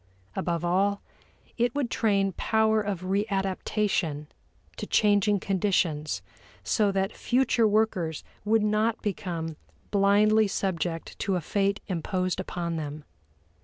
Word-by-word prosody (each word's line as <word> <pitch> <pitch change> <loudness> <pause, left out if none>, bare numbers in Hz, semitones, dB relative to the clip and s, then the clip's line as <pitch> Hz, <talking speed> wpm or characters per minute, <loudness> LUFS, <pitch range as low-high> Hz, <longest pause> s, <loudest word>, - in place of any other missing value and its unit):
Above 170 -1 -1
all, 200 +3 +2 0.6
it 240 +2 +1
would 275 -5 -1
train 200 -3 +2
power 220 +3 +2
of 200 -4 -3
readaptation 195 -4 -1 0.5
to - - -6
changing 205 -1 +3
conditions 175 -6 0 0.4
so 210 -3 +2
that 195 +1 -1
future 245 -2 +2
workers 205 -7 0 0.2
would 215 +1 +3
not 215 +2 +1
become 170 -6 -3 0.3
blindly 210 +2 +4
subject 175 -4 -3
to 195 -1 0
a - - +1
fate 200 +4 0
imposed 185 0 -2
upon 170 -3 -3
them. 150 -1 -5
195 Hz, 115 wpm, -27 LUFS, 175-210 Hz, 0.6 s, blindly